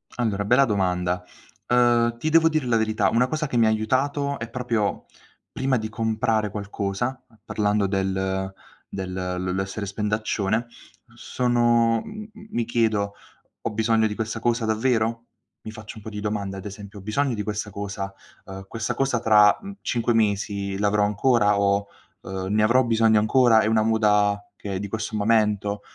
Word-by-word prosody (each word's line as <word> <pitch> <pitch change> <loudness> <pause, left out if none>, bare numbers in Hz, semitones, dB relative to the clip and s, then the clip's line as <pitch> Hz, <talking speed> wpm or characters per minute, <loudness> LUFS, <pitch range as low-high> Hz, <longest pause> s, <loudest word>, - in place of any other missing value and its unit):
Allora, 110 -5 -1
bella 120 +6 +4
domanda, 90 -4 0 0.4
uhm, 120 -1 +3
ti 155 +7 -1
devo 165 0 +5
dire 155 -4 -1
la 120 -2 +2
verità, 110 -1 +1
una 125 +2 +2
cosa 150 +2 -2
che 120 - -2
mi 115 - +5
ha - - +4
aiutato 140 +6 0
è 115 +1 -5
proprio 115 -4 -2 0.5
prima 130 -1 0
di 110 -1 -3
comprare 110 -1 0
qualcosa 105 +5 -3 0.2
parlando 105 -1 +1
del 95 0 -1 0.4
del 95 -1 -5
l 90 0 -3
l'essere 95 +2 -3
spendaccione, 105 +1 -1 0.5
sono 120 -2 +2
m 215 0 -8
m 215 -1 -14
mi 120 - -1
chiedo: 110 -3 0 0.5
"Ho - - -2
bisogno 110 0 +2
di 105 - -5
questa 110 +1 -3
cosa 115 0 0
davvero?" 115 0 0 0.4
Mi 110 - -8
faccio 110 +1 -10
un 110 - -11
po' 110 - -6
di 105 - -6
domande, 100 -2 -3
ad 95 - -9
esempio: 100 0 -9
"Ho - - -11
bisogno 125 +4 0
di 105 - -3
questa 105 0 -3
cosa?" 100 -1 -5 0.3
Uhm: 95 0 -9
"Questa 115 +2 -3
cosa 135 -3 0
tra, 105 -3 +5
mhmm, 200 0 -8
5 120 0 0
mesi 100 -2 0
l'avrò 105 0 +2
ancora?" 105 -1 +2
O 100 0 +2 0.4
ehm: 95 -1 -5
"Ne 105 0 +3
avrò 125 +4 +4
bisogno 115 -2 +3
ancora? 115 +1 +4
È - - 0
una 110 0 +3
moda 105 -2 +2
che 100 -1 -6
è - - -2
di 100 - -4
questo 110 +1 -4
momento? 105 -1 +1
110 Hz, 170 wpm, -24 LUFS, 100-120 Hz, 0.5 s, devo